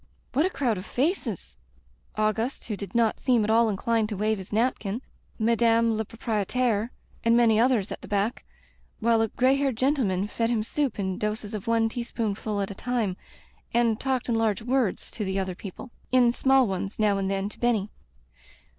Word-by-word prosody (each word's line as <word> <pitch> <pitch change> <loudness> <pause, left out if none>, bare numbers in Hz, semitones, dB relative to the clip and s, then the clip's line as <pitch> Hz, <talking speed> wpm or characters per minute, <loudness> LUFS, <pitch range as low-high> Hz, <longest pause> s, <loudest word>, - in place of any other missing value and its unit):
What 295 +7 +3
a - - -2
crowd 245 - -1
of 185 - -8
faces! 250 - -2 0.6
Auguste, 220 +4 0
who 215 - -3
did 200 +3 -8
not 230 -2 +2
seem 245 -4 +3
at 215 - +1
all 230 0 +4
inclined 220 +2 0
to 210 - -4
wave 215 +1 0
his 190 - -9
napkin, 225 0 0 0.3
Madame 230 0 +3
la 220 - -1
Proprietaire, 225 +1 -1 0.3
and 230 0 +4
many 225 -2 +4
others 235 -4 +2
at - - -6
the - - -10
back, 205 +5 -1 0.6
while 230 0 +3
a 225 - +2
gray 255 +4 +2
haired 275 -4 0
gendeman 245 -8 +1
fed 230 +2 -1
him 230 -3 +1
soup 275 +2 -1
in 190 -2 -2
doses 210 0 -3
of 215 +1 -5
one 230 -1 +3
teaspoonful 220 -3 -3
at 195 - -3
a - - -4
time 225 -3 -1 0.6
and 235 -2 +3
talked 260 -2 -1
in 240 - +1
large 225 -2 +1
words 250 -4 0
to 220 - -4
the 190 -1 -2
other 190 -1 -1
people 200 +7 -9
— - - -34
^in 245 -2 +5
small 265 -1 +4
ones, 195 +1 -3
now 205 -2 +2
and 195 0 -1
then, 195 0 -1
to 210 - -11
Benny. 220 -4 +1
225 Hz, 190 wpm, -26 LUFS, 205-240 Hz, 0.6 s, ^in